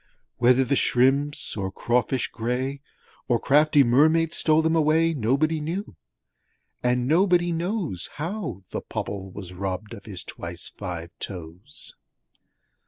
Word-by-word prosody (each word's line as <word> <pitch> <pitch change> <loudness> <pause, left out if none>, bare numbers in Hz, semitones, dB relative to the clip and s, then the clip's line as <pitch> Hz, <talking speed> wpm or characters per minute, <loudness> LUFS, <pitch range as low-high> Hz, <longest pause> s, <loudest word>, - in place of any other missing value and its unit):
Whether 125 +2 +5
the 135 +2 +1
shrimps 135 +4 +2
or 95 -2 -3
crawfish 120 +4 0
gray, 130 +4 -2 0.5
Or 120 -3 +2
crafty 150 0 +5
Mermaids 160 +7 +4
stole 155 0 +3
them 160 +1 +2
away 160 +1 +3
Nobody 150 +5 +1
knew; 170 - -4 0.9
and 125 0 +1
nobody 175 +2 +3
knows 170 - -2
How 165 - -4
the - - -3
Pobble 95 -1 -5
was 90 -2 -8
robbed 95 +4 -4
of 100 -4 -10
his 95 -4 -6
twice - - -7
five 85 -1 -6
toes! 90 - -8
135 Hz, 125 wpm, -25 LUFS, 105-160 Hz, 0.9 s, Whether